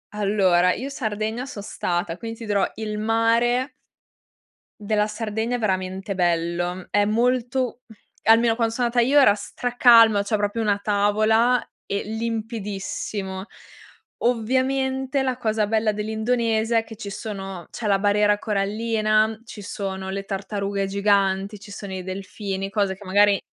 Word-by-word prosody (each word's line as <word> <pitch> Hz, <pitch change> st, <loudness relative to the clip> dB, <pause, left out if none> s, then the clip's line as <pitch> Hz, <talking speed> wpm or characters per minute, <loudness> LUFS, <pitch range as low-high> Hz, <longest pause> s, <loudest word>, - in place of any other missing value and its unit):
Allora 190 Hz, -4 st, +3 dB
io 265 Hz, +4 st, -5 dB
Sardegna 220 Hz, -2 st, -3 dB
son 245 Hz, -7 st, -8 dB
stata 175 Hz, -3 st, -2 dB
quindi 225 Hz, +1 st, -7 dB
ti 230 Hz, -, -7 dB
dirò, 205 Hz, -2 st, +1 dB
il 215 Hz, -1 st, -4 dB
mare 230 Hz, +4 st, +2 dB, 1.1 s
della 210 Hz, 0 st, +1 dB
Sardegna 220 Hz, +2 st, -2 dB
è -, -, -7 dB
veramente 190 Hz, -1 st, -2 dB
bello, 175 Hz, +1 st, -1 dB
è 205 Hz, 0 st, +2 dB
molto 245 Hz, +2 st, 0 dB
mhmm, 220 Hz, -, -15 dB, 0.3 s
almeno 225 Hz, +1 st, +5 dB
quando 230 Hz, -1 st, 0 dB
sono 245 Hz, 0 st, 0 dB
andata 235 Hz, 0 st, +2 dB
io 285 Hz, +3 st, +5 dB
era 205 Hz, -7 st, +6 dB
stra 245 Hz, +4 st, -5 dB
calma, 230 Hz, -4 st, +7 dB
cioè 215 Hz, +1 st, 0 dB
proprio 205 Hz, +2 st, -1 dB
una 205 Hz, -2 st, +1 dB
tavola 215 Hz, +4 st, +2 dB, 0.2 s
e 200 Hz, -, -2 dB
limpidissimo. 210 Hz, -3 st, -4 dB, 0.8 s
Ovviamente 265 Hz, +3 st, 0 dB
la 255 Hz, -2 st, -1 dB
cosa 220 Hz, -3 st, 0 dB
bella 220 Hz, 0 st, +1 dB
dell'Indonesia 220 Hz, +1 st, 0 dB
è 225 Hz, -, +2 dB
che 225 Hz, -, -10 dB
ci 200 Hz, -, -7 dB
sono 195 Hz, -4 st, -6 dB
c'è 220 Hz, -, -4 dB
la 195 Hz, -1 st, +3 dB
barriera 205 Hz, 0 st, +3 dB
corallina, 215 Hz, +1 st, +1 dB
ci 220 Hz, -2 st, -9 dB
sono 190 Hz, -1 st, -5 dB
le 195 Hz, +1 st, -3 dB
tartarughe 200 Hz, 0 st, -3 dB
giganti, 200 Hz, 0 st, +1 dB
ci 205 Hz, +1 st, -12 dB
sono 200 Hz, -1 st, -7 dB
i 185 Hz, -, -5 dB
delfini, 195 Hz, +1 st, -5 dB
cose 195 Hz, -1 st, 0 dB
che 200 Hz, +2 st, -14 dB
magari 200 Hz, +1 st, +4 dB
215 Hz, 145 wpm, -23 LUFS, 200-230 Hz, 1.1 s, calma